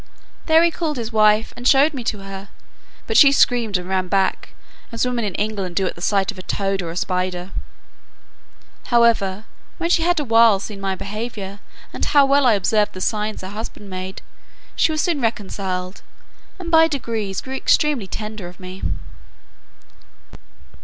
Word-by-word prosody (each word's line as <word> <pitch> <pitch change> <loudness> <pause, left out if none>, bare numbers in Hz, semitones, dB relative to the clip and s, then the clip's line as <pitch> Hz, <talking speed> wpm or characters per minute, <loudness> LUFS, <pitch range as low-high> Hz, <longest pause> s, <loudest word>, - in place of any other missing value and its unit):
There 320 0 +6
he 340 - +3
called 315 -4 -3
his 230 -1 -5
wife, 215 0 +3
and 245 +1 -2
showed 285 +3 +5
me 260 -3 -5
to 210 -3 -2
her; 195 0 -8 0.6
but - - -3
she 280 -2 +8
screamed 240 -7 +2
and 180 0 -7
ran 185 -1 -1
back, 195 0 -1 0.4
as 230 +1 -1
women 245 -2 -1
in 205 -3 -3
England 200 -4 -3
do 195 - +1
at - - -2
the 170 - -13
sight 195 +2 +1
of 200 - -13
a - - -5
toad 195 +1 -2
or 170 - -5
a 165 - -6
spider. 180 0 -2 1.3
However, 225 -5 +2 0.3
when 335 0 -1
she 335 - +3
had 345 0 +2
a - - -1
while 230 -4 +5
seen 200 0 -7
my 195 -1 -1
behaviour, 205 -1 -6 0.3
and - - -5
how 285 -1 +5
well 275 -1 +4
I 235 - +5
observed 210 +1 +1
the 185 - -8
signs 215 +2 -2
her 185 - -7
husband 205 -1 -8
made, 185 +1 -6 0.5
she - - +2
was 310 -1 0
soon 335 -6 0
reconciled, 190 -4 -3 0.6
and 350 -3 -7
by 325 0 +6
degrees 225 -9 -3
grew 265 - -7
extremely 265 -4 +1
tender 215 -2 -6
of 175 0 -13
me. 185 0 -9
210 Hz, 175 wpm, -21 LUFS, 190-250 Hz, 1.3 s, she